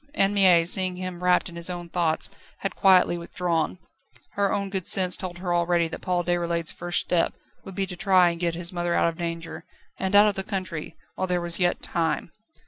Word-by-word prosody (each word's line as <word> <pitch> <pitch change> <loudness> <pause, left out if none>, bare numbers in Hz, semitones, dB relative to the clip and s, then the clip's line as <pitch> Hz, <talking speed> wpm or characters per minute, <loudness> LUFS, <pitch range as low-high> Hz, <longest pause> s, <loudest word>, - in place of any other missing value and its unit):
Anne 195 -4 +2
Mie, 185 -4 +5
seeing 185 +1 +1
him 180 -1 -6
wrapped 180 0 +3
in 170 - -10
his 170 +1 -4
own 175 -1 -5
thoughts, 165 -2 0 0.3
had - - -3
quietly 185 -3 +4
withdrawn. 170 0 -2 0.5
Her 200 -1 0
own 200 -1 -2
good 190 -3 -2
sense 185 -2 +3
told 180 -2 -5
her 175 -1 -2
already 170 -1 +2
that - - -7
Paul 180 -1 0
Déroulède's 170 -1 0
first 175 0 -1
step 175 -2 0 0.3
would 190 - -10
be 195 - 0
to 185 -1 -7
try 185 -2 +4
and 170 - -7
get 170 -1 0
his 175 +1 -4
mother 175 -1 -1
out - - +3
of 165 +1 -9
danger, 170 -1 -5 0.4
and 190 +1 -1
out 205 +1 +8
of 210 - +1
the 195 - -2
country, 185 -5 -5 0.2
while 185 - -2
there 180 -1 0
was 170 0 -2
yet 175 -1 +1
time. 165 -1 -1
175 Hz, 215 wpm, -25 LUFS, 170-185 Hz, 0.5 s, out